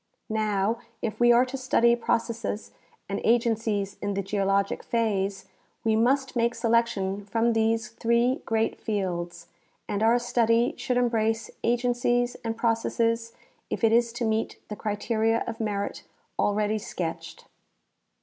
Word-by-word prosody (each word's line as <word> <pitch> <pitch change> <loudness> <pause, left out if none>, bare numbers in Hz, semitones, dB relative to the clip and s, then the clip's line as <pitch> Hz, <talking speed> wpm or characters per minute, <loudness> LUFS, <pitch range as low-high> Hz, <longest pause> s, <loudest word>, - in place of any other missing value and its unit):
Now, 215 0 0 0.2
if 220 - -3
we 240 0 +6
are 240 +2 +5
to 255 +1 -6
study 235 -2 +3
processes 230 -2 -2 0.4
and 200 - -3
agencies 225 -4 +1
in 205 -1 -2
the 200 - -1
geologic 195 0 0
phase, 200 -4 -1 0.4
we 220 -1 +2
must 260 +4 +2
make 235 0 +1
selection 230 -4 +1
from 230 +3 +1
these 225 0 +1
three 235 +3 +1
great 225 0 -1
fields, 175 -5 -3 0.4
and 205 - -2
our 230 +2 +5
study 240 0 +2
should 250 - -1
embrace 225 -2 +1
agencies 245 0 +1
and 225 -1 -3
processes 230 0 0 0.4
if - - -4
it 225 - +5
is 235 0 +3
to 240 0 -2
meet 220 0 -1
the 210 - -4
criteria 220 +2 0
of 225 -1 -5
merit 205 -2 -2 0.4
alread}^ 210 +1 +1
sketched. 175 -6 -5
225 Hz, 135 wpm, -26 LUFS, 205-235 Hz, 0.4 s, we